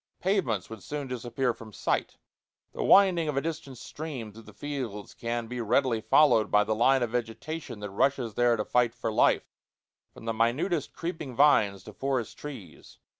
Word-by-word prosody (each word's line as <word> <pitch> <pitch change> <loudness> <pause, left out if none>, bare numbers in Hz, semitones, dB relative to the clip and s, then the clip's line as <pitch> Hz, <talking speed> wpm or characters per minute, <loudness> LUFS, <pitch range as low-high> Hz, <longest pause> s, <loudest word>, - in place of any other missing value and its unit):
Pavements 175 - 0
would 110 -3 -9
soon 145 +7 -5
disappear 125 0 -1
from 110 -1 -12
sight; - - -2 0.6
the - - -3
winding 185 -5 +5
of 150 -2 -2
a - - +2
distant 150 -5 -5
stream 130 -6 -7
through 115 - -12
the - - -14
fields 130 -8 -5
can 120 0 -3
be 120 +1 -5
readily 115 0 +1
followed 115 -3 +4
by 105 0 +4
the 110 +1 0
line 125 +4 +3
of 115 - -2
vegetation 120 +2 -4
that 105 -1 -5
rushes 125 +1 +1
there 120 +1 +3
to 105 - -2
fight 120 -1 +2
for 115 -2 -3
life, - - +2 0.6
from - - -13
the 115 - -1
minutest 125 - 0
creeping 160 -7 -5
vines 110 -9 +4
to 105 - -11
forest 130 -1 -2
trees. 120 - -10
120 Hz, 175 wpm, -28 LUFS, 110-145 Hz, 0.6 s, winding